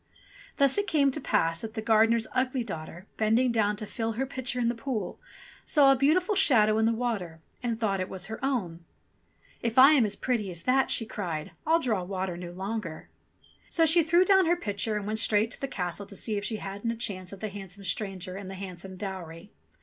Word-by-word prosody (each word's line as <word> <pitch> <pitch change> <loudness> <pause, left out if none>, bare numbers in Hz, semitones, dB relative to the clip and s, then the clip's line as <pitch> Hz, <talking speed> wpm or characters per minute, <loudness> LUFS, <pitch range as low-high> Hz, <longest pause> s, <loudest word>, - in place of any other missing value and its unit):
Thus 280 +5 +3
it 405 - -1
came 285 -6 +3
to 300 - -5
pass 165 -8 +1
that 225 0 -7
the - - -2
gardener's 225 +1 +4
ugly 255 0 0
daughter, 170 -3 -7
bending 225 +3 +3
down 210 -2 +1
to 215 - -6
fill 225 +1 -3
her 260 +5 -1
pitcher 260 -2 -4
in 235 - +1
the 235 - +1
pool, 230 -4 -4 0.4
saw 280 -2 +5
a - - +5
beautiful 320 - +2
shadow 220 - +4
in 220 - +3
the 225 - +3
water, 220 -9 -3 0.2
and 235 -2 -2
thought 200 -4 0
it 185 - -3
was 190 0 -5
her 220 +5 -7
own! 185 -12 -2 0.8
"If 230 0 -2
I 265 +3 +9
am 275 -5 +5
as 210 - 0
pretty 230 -6 -1
as 170 -2 -7
that," 260 +1 +2
she 225 - 0
cried, 170 -8 -4 0.2
"I'll 325 +1 +4
draw 225 - 0
water 185 -1 -3
no 175 0 -7
longer 190 -2 -5 0.3
!" - - -30
So 330 - +3
she 330 +2 +6
threw 340 +3 +4
down 380 -2 +5
her 345 - +4
pitcher, 210 - -2
and 205 - -4
went 215 +1 -1
straight 215 +1 +2
to - - -3
the 275 - -1
castle 185 -3 -4
to 200 - -11
see 215 +3 -2
if 200 - -2
she 220 +2 -1
hadn't 200 +2 -4
a 230 - -1
chance 195 -6 -4
of 200 - -9
the 215 - -3
handsome 195 0 -8
stranger 190 0 -3
and 195 -1 -7
the 195 - -7
handsome 185 -1 -8
dowry. 185 -2 -7
220 Hz, 225 wpm, -28 LUFS, 190-255 Hz, 0.8 s, I